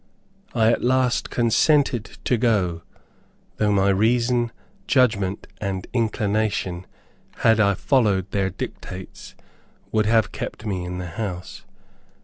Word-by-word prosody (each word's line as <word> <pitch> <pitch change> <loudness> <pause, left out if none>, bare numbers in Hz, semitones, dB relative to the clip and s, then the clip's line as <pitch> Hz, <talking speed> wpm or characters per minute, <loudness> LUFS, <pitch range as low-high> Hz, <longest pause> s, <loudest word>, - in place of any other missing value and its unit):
I 115 -1 +4
at - - -1
last 125 0 +1
consented 120 0 +2
to 125 - +2
go, 100 -8 +1 0.8
though 105 -1 +2
my 100 -1 +3
reason, 120 +4 +2 0.4
judgment, 105 -7 +2
and 95 -2 -3
inclination, 105 -5 -1 0.6
had 115 -1 +5
I 100 -2 +4
followed 100 - +1
their 95 -1 0
dictates, 95 0 -8 0.6
would 110 -1 +2
have 110 -1 +3
kept 110 - -6
me 95 -4 -2
in 90 0 -5
the 90 - -5
house. 90 -1 -6
105 Hz, 120 wpm, -23 LUFS, 95-120 Hz, 0.8 s, had